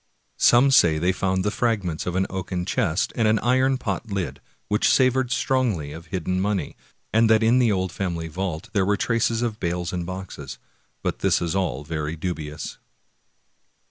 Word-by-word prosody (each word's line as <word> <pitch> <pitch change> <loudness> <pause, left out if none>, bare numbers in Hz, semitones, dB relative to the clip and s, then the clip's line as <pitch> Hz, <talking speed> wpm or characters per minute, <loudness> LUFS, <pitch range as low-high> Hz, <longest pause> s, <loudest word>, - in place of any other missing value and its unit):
Some 125 +3 +6
say 85 -11 +5
they 90 +4 +2
found 95 0 0
the 105 - 0
fragments 100 -10 -1
of 90 - -2
an 95 +1 +2
oaken 90 -1 -4
chest, 90 -1 0
and 115 -2 +2
an 110 +1 +4
iron 130 +3 +2
pot 110 -2 -4
lid, 100 -3 -3 0.3
which 105 +1 +2
savored 130 -1 +3
strongly 120 - 0
of 80 +2 -10
hidden 90 +1 -2
money, 100 -1 -1 0.4
and 110 +1 +4
that 110 0 +5
in 120 +3 +4
the 120 -3 +3
old 95 -2 -1
family 85 -4 -3
vault 85 -1 -4
there 100 -3 +2
were 100 +2 +1
traces 115 +1 +1
of 110 -3 -2
bales 85 0 -2
and 90 -1 -3
boxes; 95 -7 -7 0.5
but - - -2
this - - +2
is 85 +1 -2
all 90 -8 -1
very 75 0 -3
dubious. 80 -2 -5
95 Hz, 175 wpm, -24 LUFS, 85-115 Hz, 0.5 s, Some